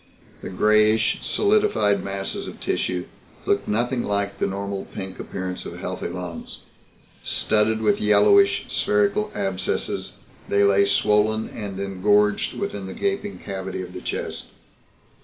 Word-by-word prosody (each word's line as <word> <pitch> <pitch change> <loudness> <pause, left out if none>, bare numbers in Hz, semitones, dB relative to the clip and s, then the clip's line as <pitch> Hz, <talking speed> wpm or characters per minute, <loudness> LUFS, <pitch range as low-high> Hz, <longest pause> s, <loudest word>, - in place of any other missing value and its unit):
The - - -6
grayish 110 +3 +3
solidified 200 - +2
masses 100 0 -3
of - - -9
tissue 90 -1 -1 0.4
looked - - +1
nothing 120 +3 0
like 100 -1 -1
the - - +1
normal 100 0 -4
pink 95 -1 -7
appearance 95 -1 -5
of - - -8
healthy - - -4
lungs. 90 -2 -7 0.6
Studded 110 +1 +1
with 205 - +2
yellowish 400 - +5
spherical 210 0 +1
abscesses 95 -2 -1 0.4
they 100 0 +3
lay 100 0 +4
swollen 105 +2 +2
and 100 -3 -6
engorged 105 +2 +1
within 100 -2 -4
the 95 - -7
gaping 200 0 -2
cavity 95 -1 -5
of 90 0 -10
the 90 - -7
chest. - - -4
100 Hz, 130 wpm, -23 LUFS, 95-110 Hz, 0.6 s, yellowish